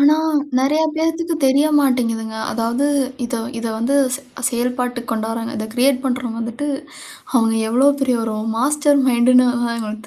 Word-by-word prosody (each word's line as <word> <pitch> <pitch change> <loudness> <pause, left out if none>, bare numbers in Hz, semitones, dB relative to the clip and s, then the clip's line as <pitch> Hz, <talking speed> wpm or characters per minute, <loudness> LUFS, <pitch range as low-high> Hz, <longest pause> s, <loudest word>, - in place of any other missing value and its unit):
ஆனா, 290 +2 +6 0.4
நிறைய 285 +4 +2
பேத்துக்கு 325 +1 -1
தெரிய 275 +3 +4
மாட்டேங்கிதுங்க. 230 -5 0 0.2
அதாவது 235 +5 0 0.4
இத 245 +1 -4 0.2
இத 230 - -4
வந்து 235 +5 0 0.2
செ - - -13 0.3
செயல்பாட்டுக்கு 245 0 -3
கொண்டுவராங்க. 225 +1 -3
இத 215 0 -4
கிரியேட் 260 +1 +2
பண்றவுங்க 245 -3 -2
வந்துவிட்டு, 235 +6 -4 0.7
அவுங்க 225 -2 +3
எவ்ளோ 250 +5 +3
பெரிய 260 -2 +2
ஒரு 220 -1 -3 0.2
மாஸ்டர் 290 +3 +2
மைண்ட்ன்னு 250 +1 +4 0.3
எங்களுக்கு 215 -1 -6
250 Hz, 135 wpm, -19 LUFS, 230-275 Hz, 0.7 s, ஆனா